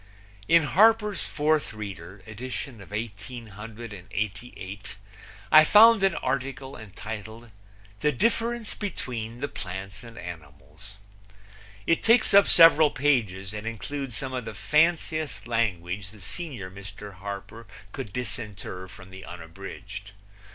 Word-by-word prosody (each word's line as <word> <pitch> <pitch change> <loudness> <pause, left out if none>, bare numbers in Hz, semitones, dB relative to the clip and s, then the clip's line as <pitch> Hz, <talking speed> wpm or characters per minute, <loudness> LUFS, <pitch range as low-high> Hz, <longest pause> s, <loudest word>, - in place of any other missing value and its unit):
In 165 0 +6
Harper's 210 +6 +4
Fourth 155 -3 +1
Reader, 100 -3 -8
edition 120 +1 -6
of 95 - -12
1888, 105 -2 -6 0.6
I 155 0 +10
found 220 +5 +8
an 195 -4 +3
article 135 +1 -3
entitled 110 +2 -8 0.5
The 150 - +2
Difference 230 - 0
Between 120 - -5
the 140 - 0
Plants 95 +1 -7
and 115 -1 -12
Animals. 85 +3 -10 0.9
It 165 - +3
takes 230 -1 +4
up 200 0 +8
several 165 -2 +8
pages 110 -10 +1
and 105 +1 -5
includes 125 +3 -4
some 130 -1 -4
of 125 -3 -3
the - - -6
fanciest 155 -6 +1
language 100 -4 -1
the 105 +1 -15
senior 115 - -5
Mr. 100 +1 -9
Harper 100 +4 -7 0.2
could 100 - -6
disinter 105 -5 -4
from 95 0 -13
the 95 0 -9
Unabridged. 90 +3 -9
115 Hz, 115 wpm, -27 LUFS, 100-145 Hz, 0.9 s, I